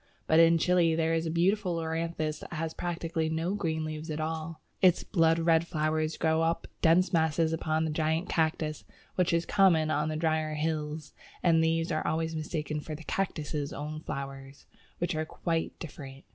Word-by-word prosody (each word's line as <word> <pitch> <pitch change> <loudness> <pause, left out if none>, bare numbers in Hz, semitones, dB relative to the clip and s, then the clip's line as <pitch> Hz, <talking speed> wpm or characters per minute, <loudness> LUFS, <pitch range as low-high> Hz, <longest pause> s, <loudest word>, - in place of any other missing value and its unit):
But 160 - +4
in 165 0 +6
Chile 170 -1 +3
there 165 0 +1
is 165 0 0
a - - -1
beautiful 180 +3 +1
Loranthus 160 -1 -2
that - - -10
has 160 0 -3
practically 165 -2 -2
no 165 +4 -1
green 160 -6 -1
leaves 155 +1 -5
at 155 0 -3
all. 160 0 -4 0.2
Its 180 -2 +5
blood 165 -4 +3
red 165 0 +3
flowers 155 -1 -1
grow 160 0 +2
in 165 +1 +2 0.3
dense 175 +3 +4
masses 160 0 +2
upon 160 0 0
the 160 - -1
giant 160 +3 0
Cactus, 155 -2 -1 0.3
which 180 -2 +1
is 170 0 +1
common 165 -6 +4
on 150 0 0
the 155 - -2
drier 155 -1 0
hills, 150 -1 -3 0.3
and 165 -2 +4
these 165 +1 +1
are 155 - -1
always 160 0 -1
mistaken 155 -1 -3
for 155 +1 -6
the 160 - -10
Cactus's 150 -6 -2
own 150 +1 -5
flowers, 135 -2 -7 0.3
which 175 0 -1
are 155 0 -1
quite 165 +1 -3
different. 140 -4 -9
160 Hz, 180 wpm, -29 LUFS, 155-165 Hz, 0.3 s, in